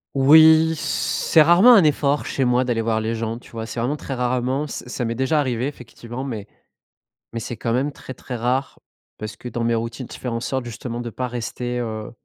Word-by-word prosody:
Oui, 160 Hz, +3 st, +7 dB
c'est 160 Hz, +1 st, +1 dB
rarement 175 Hz, +10 st, +7 dB
un 195 Hz, -8 st, +6 dB
effort 145 Hz, -1 st, +1 dB
chez 135 Hz, -, -1 dB
moi 125 Hz, 0 st, +2 dB
d'aller 120 Hz, -2 st, 0 dB
voir 110 Hz, -1 st, 0 dB
les 110 Hz, +1 st, -2 dB
gens, 115 Hz, 0 st, -3 dB
tu -, -, -17 dB
vois? 115 Hz, -1 st, -5 dB
C'est 115 Hz, -, -6 dB
vraiment 125 Hz, +6 st, 0 dB
très 140 Hz, -, -6 dB
rarement. 130 Hz, +3 st, -1 dB
Ça 125 Hz, -, -7 dB
ça 125 Hz, -, -3 dB
m'est 115 Hz, 0 st, -2 dB
déjà 130 Hz, +5 st, +1 dB
arrivé 125 Hz, -3 st, -1 dB
effectivement, 125 Hz, -1 st, -8 dB
mais 110 Hz, -6 st, -5 dB, 0.8 s
mais 115 Hz, -, -4 dB
c'est 120 Hz, -, -5 dB
quand 115 Hz, -1 st, -2 dB
même 135 Hz, +4 st, 0 dB
très 130 Hz, -2 st, -10 dB
très 125 Hz, +1 st, -7 dB
rare, 125 Hz, +4 st, -1 dB, 0.4 s
parce 110 Hz, -1 st, -6 dB
que, 125 Hz, -, -8 dB
dans 120 Hz, +1 st, -3 dB
mes 115 Hz, 0 st, +1 dB
routines, 115 Hz, +2 st, -4 dB
faire 125 Hz, -2 st, -5 dB
en 115 Hz, -, -2 dB
sorte, 130 Hz, +1 st, -3 dB
justement, 120 Hz, 0 st, -6 dB
de 120 Hz, -1 st, -5 dB
pas 125 Hz, +2 st, -3 dB
rester, 120 Hz, +1 st, -4 dB
heu 110 Hz, -2 st, -5 dB
125 Hz, 215 wpm, -22 LUFS, 115-140 Hz, 0.8 s, Oui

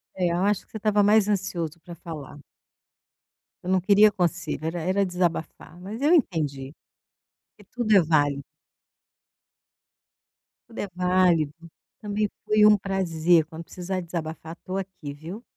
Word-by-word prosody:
É, 180 Hz, -2 st, 0 dB
eu 170 Hz, -, 0 dB
acho 205 Hz, -1 st, +1 dB
que -, -, -33 dB
você -, -, -6 dB
estava 210 Hz, -1 st, +2 dB
mais 210 Hz, 0 st, +4 dB
ansioso 175 Hz, -5 st, -2 dB
pra 175 Hz, 0 st, -10 dB
falar. 150 Hz, -3 st, -9 dB, 1.2 s
Você 180 Hz, -, -9 dB
não 185 Hz, -1 st, +2 dB
queria 205 Hz, +2 st, +5 dB
conselho, 175 Hz, -4 st, -2 dB
era 170 Hz, +1 st, -3 dB
era 190 Hz, +4 st, +1 dB
desabafar. 175 Hz, -2 st, -3 dB
Mas 210 Hz, +5 st, -7 dB
eu 300 Hz, +4 st, +4 dB
entendi, 150 Hz, -, 0 dB, 0.8 s
porque 205 Hz, -3 st, -21 dB
tudo 235 Hz, -4 st, +1 dB
é 190 Hz, -, +7 dB
váli 145 Hz, -3 st, +1 dB, 2.3 s
Tudo 230 Hz, -, -11 dB
é 205 Hz, -, -2 dB
válido. 180 Hz, -4 st, +2 dB, 0.5 s
Também 210 Hz, 0 st, -1 dB, 0.2 s
foi 215 Hz, 0 st, +4 dB
um 210 Hz, 0 st, +7 dB
prazer, 175 Hz, -4 st, +1 dB
quando 165 Hz, +1 st, -9 dB
precisar 185 Hz, +2 st, -5 dB
desabafar 165 Hz, -1 st, -6 dB
estou 185 Hz, +1 st, -6 dB
aqui, 185 Hz, -7 st, -6 dB
viu. 170 Hz, -, -9 dB
180 Hz, 145 wpm, -25 LUFS, 160-205 Hz, 2.3 s, é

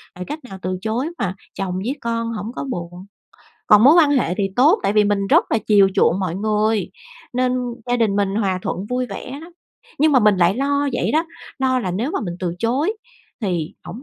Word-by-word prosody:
Rồi 180 Hz, -, -6 dB
cách 300 Hz, -, -5 dB
nào 195 Hz, -, -8 dB
từ 185 Hz, 0 st, -2 dB
chối 235 Hz, +8 st, -2 dB
mà 190 Hz, -3 st, -2 dB, 0.2 s
chồng 190 Hz, -2 st, -3 dB
với 220 Hz, +9 st, -2 dB
con 230 Hz, 0 st, -2 dB
hổng 215 Hz, +1 st, -5 dB
có -, -, -4 dB
buồn? 175 Hz, -1 st, -6 dB, 0.6 s
Còn 210 Hz, +2 st, +7 dB
mối 285 Hz, -, +8 dB
quan 325 Hz, -4 st, +5 dB
hệ 250 Hz, -, +1 dB
thì 200 Hz, -, +1 dB
tốt 310 Hz, -, +5 dB
tại -, -, +1 dB
vì 210 Hz, 0 st, +4 dB
mình 205 Hz, -1 st, 0 dB
rất -, -, +4 dB
là 225 Hz, -, +2 dB
chiều 200 Hz, -2 st, +5 dB
chuộng 185 Hz, -, +3 dB
mọi 180 Hz, -3 st, -2 dB
người, 215 Hz, +1 st, 0 dB, 0.4 s
nên 250 Hz, 0 st, +1 dB, 0.3 s
gia 245 Hz, 0 st, +1 dB
đình 220 Hz, -4 st, +1 dB
mình 200 Hz, -1 st, 0 dB
hòa 195 Hz, -4 st, 0 dB
thuận 190 Hz, -, -3 dB
vui 250 Hz, 0 st, -1 dB
vẻ 230 Hz, +6 st, -7 dB
lắm. 340 Hz, +2 st, -12 dB, 0.5 s
Nhưng 305 Hz, +1 st, +4 dB
mà 260 Hz, -, +6 dB
mình 210 Hz, -2 st, +4 dB
lại 175 Hz, +1 st, +3 dB
lo 280 Hz, +1 st, 0 dB
vậy 245 Hz, -, -1 dB
đó, 315 Hz, +2 st, +2 dB, 0.3 s
lo 260 Hz, -1 st, +1 dB
là 185 Hz, -6 st, -3 dB
nếu 225 Hz, -, -2 dB
mà -, -, -2 dB
mình 175 Hz, -2 st, -4 dB
từ 175 Hz, -2 st, -2 dB
chối 265 Hz, -, 0 dB, 0.5 s
thì 175 Hz, -6 st, -2 dB
hổng 195 Hz, +9 st, -8 dB
215 Hz, 225 wpm, -20 LUFS, 190-255 Hz, 0.6 s, mối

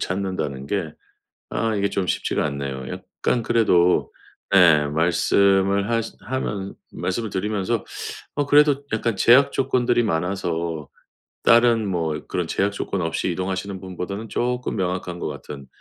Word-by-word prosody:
찾는다는 90 Hz, -8 st, -3 dB
게 80 Hz, -4 st, -2 dB, 0.6 s
아 115 Hz, -1 st, 0 dB
이게 100 Hz, 0 st, +1 dB
좀 95 Hz, -2 st, -1 dB
쉽지가 -, -, 0 dB
않네요. 70 Hz, -2 st, -4 dB
약간 120 Hz, -2 st, -2 dB
그래도 90 Hz, -7 st, +3 dB, 0.4 s
예 80 Hz, -6 st, +6 dB
말씀을 95 Hz, +5 st, +2 dB
하시 115 Hz, -1 st, -1 dB
하면은 105 Hz, -6 st, -3 dB, 0.2 s
말씀을 110 Hz, +4 st, -3 dB
드리면서 105 Hz, +3 st, -1 dB, 0.5 s
어 145 Hz, -, 0 dB
그래도 145 Hz, -1 st, +5 dB
약간 110 Hz, 0 st, 0 dB
제약 125 Hz, +8 st, +5 dB
조건들이 125 Hz, -2 st, +1 dB
많아서 85 Hz, -5 st, -2 dB, 0.5 s
다른 115 Hz, -2 st, +5 dB
뭐 80 Hz, -4 st, -2 dB
그런 -, -, -2 dB
제약 100 Hz, +1 st, 0 dB
조건 100 Hz, -2 st, -3 dB
없이 80 Hz, +2 st, -1 dB
이동하시는 95 Hz, +2 st, -3 dB
분보다는 95 Hz, +4 st, -5 dB
조금 125 Hz, +2 st, -1 dB
명확한 90 Hz, -1 st, -2 dB
것 -, -, -3 dB
같은 70 Hz, -2 st, -8 dB
95 Hz, 300 characters per minute, -23 LUFS, 85-115 Hz, 0.6 s, 예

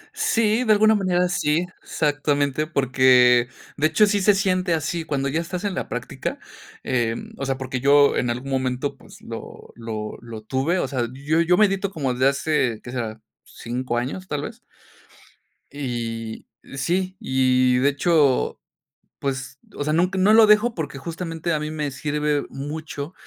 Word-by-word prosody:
Sí, 230 Hz, -, +2 dB
de 220 Hz, -, +2 dB
alguna 215 Hz, +1 st, +5 dB
manera 180 Hz, -3 st, +1 dB
sí, 170 Hz, -1 st, +1 dB, 0.2 s
exactamente, 145 Hz, 0 st, 0 dB
porque, 125 Hz, -4 st, +4 dB, 0.3 s
de 155 Hz, +2 st, +3 dB
hecho, 210 Hz, +6 st, +4 dB
sí 205 Hz, -1 st, +1 dB
se 205 Hz, +1 st, +5 dB
siente 185 Hz, -3 st, +1 dB
así 160 Hz, +1 st, -3 dB
cuando 140 Hz, -2 st, -1 dB
ya 155 Hz, +4 st, 0 dB
estás 175 Hz, +3 st, -5 dB
en 200 Hz, -2 st, -1 dB
la -, -, -4 dB
práctica. -, -, -4 dB, 0.5 s
Eh, 120 Hz, -3 st, 0 dB, 0.2 s
o 135 Hz, -, -4 dB
sea, 135 Hz, -1 st, -1 dB
porque 130 Hz, -1 st, -4 dB
yo 140 Hz, +2 st, +5 dB
en 125 Hz, -, 0 dB
algún 125 Hz, +3 st, -4 dB
momento, 130 Hz, +1 st, -1 dB
pues, -, -, -16 dB
lo, -, -, -9 dB
lo, 110 Hz, -2 st, -6 dB
lo 115 Hz, -2 st, -9 dB
tuve, 135 Hz, +10 st, 0 dB
o 135 Hz, -, 0 dB
sea, 125 Hz, -3 st, -2 dB
yo 150 Hz, +5 st, 0 dB
yo 175 Hz, +2 st, +3 dB
medito 200 Hz, -2 st, +2 dB
como 135 Hz, -8 st, -2 dB
de 130 Hz, +2 st, +2 dB
hace, 135 Hz, -5 st, 0 dB
¿qué 120 Hz, -, -8 dB
será? 115 Hz, -3 st, -4 dB, 0.2 s
5 120 Hz, +1 st, -4 dB
años, 140 Hz, +10 st, -4 dB
tal 145 Hz, -1 st, -3 dB
vez. -, -, -8 dB, 1.1 s
Y 115 Hz, -5 st, -5 dB, 0.3 s
sí, 185 Hz, +7 st, -1 dB
y, 130 Hz, -, +2 dB
de 140 Hz, +3 st, +3 dB
hecho, 145 Hz, -3 st, +2 dB, 0.6 s
pues, 130 Hz, -2 st, -4 dB, 0.2 s
o 145 Hz, -, -3 dB
sea, 155 Hz, +1 st, 0 dB
nunca 180 Hz, +3 st, +1 dB
no 205 Hz, +3 st, +5 dB
lo 220 Hz, -1 st, +7 dB
dejo 210 Hz, +3 st, +4 dB
porque 145 Hz, -4 st, -4 dB
justamente 165 Hz, +2 st, -4 dB
a 155 Hz, -, 0 dB
mí 150 Hz, -, -4 dB
me 150 Hz, -2 st, -3 dB
sirve 150 Hz, +2 st, -1 dB
mucho, 145 Hz, +3 st, -6 dB
145 Hz, 170 wpm, -23 LUFS, 130-175 Hz, 1.1 s, lo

